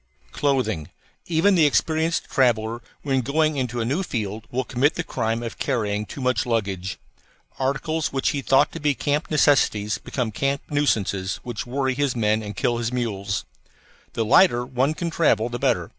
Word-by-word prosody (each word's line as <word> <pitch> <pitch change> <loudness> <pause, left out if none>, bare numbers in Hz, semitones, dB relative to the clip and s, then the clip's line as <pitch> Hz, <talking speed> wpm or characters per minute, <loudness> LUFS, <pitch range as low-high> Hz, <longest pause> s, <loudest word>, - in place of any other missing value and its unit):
CLOTHING 130 - 0 0.4
Even 170 +4 +3
the 165 -5 +5
experienced 160 +3 +1
traveller 120 -3 +1 0.2
when 135 -2 +1
going 155 +4 +1
into 125 -3 -2
a 115 - 0
new 140 +10 0
field 110 - -4
will 130 +2 -1
commit 130 +6 +1
the 175 - -2
crime 115 -4 -2
of 115 - -6
carrying 105 -5 -1
too 140 - -8
much 125 -4 +1
luggage. 100 -5 -2 0.6
Articles 145 +4 -1
which 135 -1 0
he 145 -2 -2
thought 135 0 +3
to 165 - -7
be 150 -2 +1
camp 145 +3 -1
necessities 130 -7 +2
become 125 -4 -3
camp 140 +6 -1
nuisances 100 -10 0
which 120 -1 -5
worry 130 +1 0
his 140 -1 0
men 110 -1 +1
and 105 -2 -7
kill 120 +3 +1
his 115 0 -2
mules. 100 -6 -2 0.7
The 115 - -1
lighter 120 - +5
one 130 +4 0
can 170 +1 -3
travel 135 -8 +2
the 120 0 -4
better. - - +1
125 Hz, 175 wpm, -23 LUFS, 110-145 Hz, 0.7 s, the